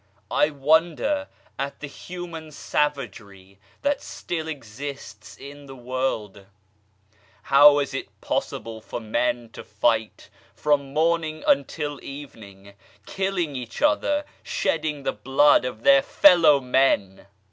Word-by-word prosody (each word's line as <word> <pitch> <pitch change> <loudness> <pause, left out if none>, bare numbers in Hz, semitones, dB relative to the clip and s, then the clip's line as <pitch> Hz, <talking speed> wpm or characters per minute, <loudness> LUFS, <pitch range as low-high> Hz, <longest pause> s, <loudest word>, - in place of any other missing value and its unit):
I 150 - +3
wonder 160 - +1 0.3
at 140 +1 -4
the - - -6
human 165 +1 -8
savagery 105 -11 -3 0.2
that 285 -1 0
still 160 -2 -5
exists 135 -5 -8
in 145 +1 -11
the 135 - -10
world! 120 -6 -4 1.0
How 145 +1 +7
is 140 -1 -1
it 135 - -5
possible 110 -1 -4
for 110 - -6
men 120 +1 -1
to - - -10
fight 110 +1 -1 0.3
from 145 -2 0
morning 160 0 0
until 145 +1 0
evening, 105 -9 -11 0.3
killing 190 -6 -2
each 125 -3 -6
other, 295 0 +2 0.2
shedding 150 -3 -2
the - - -1
blood 135 +5 +3
of 120 -3 -6
their 140 0 +6
fellow 165 -6 +5
men 125 -8 +1
140 Hz, 115 wpm, -24 LUFS, 115-155 Hz, 1.0 s, How